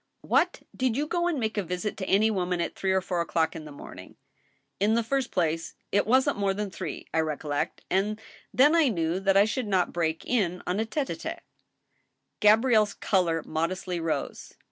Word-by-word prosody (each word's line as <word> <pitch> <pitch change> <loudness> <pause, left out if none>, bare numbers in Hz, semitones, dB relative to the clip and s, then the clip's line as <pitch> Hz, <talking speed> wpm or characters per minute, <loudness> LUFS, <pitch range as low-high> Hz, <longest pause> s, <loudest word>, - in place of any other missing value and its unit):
" - - -50
What! - - +1
did 255 -2 0
you 295 - +1
go 345 +2 0
and 330 -5 0
make 220 -2 -1
a - - -1
visit 180 +4 -3
to 190 - -4
any 215 +3 +4
woman 180 -3 -1
at 170 - -2
three 190 - -1
or 190 0 +2
four 180 -2 -1
o'clock 165 -1 0
in 155 - -7
the 150 - -9
morning? 140 - -11 0.2
" - - -40
" - - -49
In 210 +3 +3
the 235 - +2
first 265 +2 -1
place, 165 -2 -1 0.2
it 205 - +2
wasn't 260 0 +3
more 195 -1 +1
than 205 -1 -3
three. 180 -5 -6
I 160 - +2
recollect, 150 -2 -2
and 205 +3 0 0.3
then 290 +5 +5
I 325 -3 +5
knew 170 -5 0
that 195 0 +3
I 200 - +6
should 235 +1 -2
not 190 -3 +1
break 160 -2 -1
in 185 -7 0
on 180 +3 -1
a 220 - +1
tete^^tite*^ 280 +3 -3 1.0
Gabrielle's 215 0 +4
color 170 -5 +1
modestly 175 +2 -2
rose. 165 -1 -3
195 Hz, 205 wpm, -27 LUFS, 170-220 Hz, 1.0 s, I